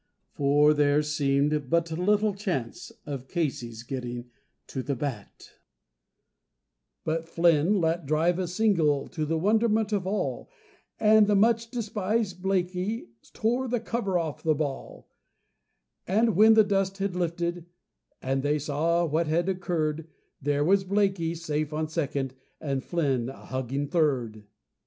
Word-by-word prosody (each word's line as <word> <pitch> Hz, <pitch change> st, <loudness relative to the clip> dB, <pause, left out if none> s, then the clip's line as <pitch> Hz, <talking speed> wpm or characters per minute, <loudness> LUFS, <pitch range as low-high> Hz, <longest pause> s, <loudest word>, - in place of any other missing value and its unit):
For 145 Hz, +2 st, +4 dB
there 145 Hz, 0 st, +3 dB
seemed 145 Hz, -1 st, 0 dB
but 170 Hz, +1 st, +1 dB
little 205 Hz, +5 st, +2 dB
chance 180 Hz, -, -4 dB
of 135 Hz, -3 st, -6 dB
Casey's 125 Hz, -9 st, -3 dB
getting 120 Hz, -1 st, -6 dB, 0.3 s
to 130 Hz, -, -5 dB
the 140 Hz, +2 st, -2 dB
bat, 125 Hz, -6 st, -6 dB, 1.5 s
But 165 Hz, +1 st, -2 dB
Flynn 170 Hz, +3 st, +3 dB
let 165 Hz, -2 st, 0 dB
drive 165 Hz, +4 st, +2 dB
a 185 Hz, -, -1 dB
"single," 170 Hz, -8 st, +1 dB
to 155 Hz, -3 st, -3 dB
the 165 Hz, +1 st, 0 dB
wonderment 215 Hz, +3 st, +2 dB
of 190 Hz, -3 st, -1 dB
all, 205 Hz, +2 st, -2 dB, 0.5 s
And 215 Hz, -1 st, +5 dB
the 205 Hz, -, +3 dB
much 230 Hz, +2 st, +3 dB
despised 215 Hz, -4 st, -2 dB
Blakey 190 Hz, -, -1 dB, 0.2 s
"tore 245 Hz, +4 st, 0 dB
the 245 Hz, 0 st, 0 dB
cover 220 Hz, -5 st, -1 dB
off 160 Hz, -4 st, -3 dB
the 155 Hz, -1 st, +2 dB
ball"; 140 Hz, -2 st, -5 dB, 1.0 s
And 220 Hz, +2 st, +2 dB
when 220 Hz, +3 st, +7 dB
the 220 Hz, -, +7 dB
dust 195 Hz, -1 st, 0 dB
had 195 Hz, -2 st, -2 dB
lifted 175 Hz, 0 st, -2 dB, 0.6 s
and 135 Hz, +1 st, 0 dB
they 145 Hz, +2 st, +1 dB
saw 155 Hz, +4 st, 0 dB
what 160 Hz, +1 st, 0 dB
had 170 Hz, +4 st, +1 dB
occurred, 160 Hz, -4 st, -2 dB, 0.3 s
There 145 Hz, +1 st, +1 dB
was 190 Hz, +4 st, +3 dB
Blakey 195 Hz, -4 st, 0 dB
safe 155 Hz, -2 st, -2 dB
at 155 Hz, 0 st, -2 dB
second, 140 Hz, -5 st, -2 dB, 0.3 s
and 135 Hz, -3 st, -2 dB
Flynn 135 Hz, -8 st, 0 dB
a 135 Hz, -, -11 dB
huggin' 130 Hz, +2 st, -3 dB
third. 130 Hz, -, 0 dB
165 Hz, 140 wpm, -27 LUFS, 145-195 Hz, 1.5 s, when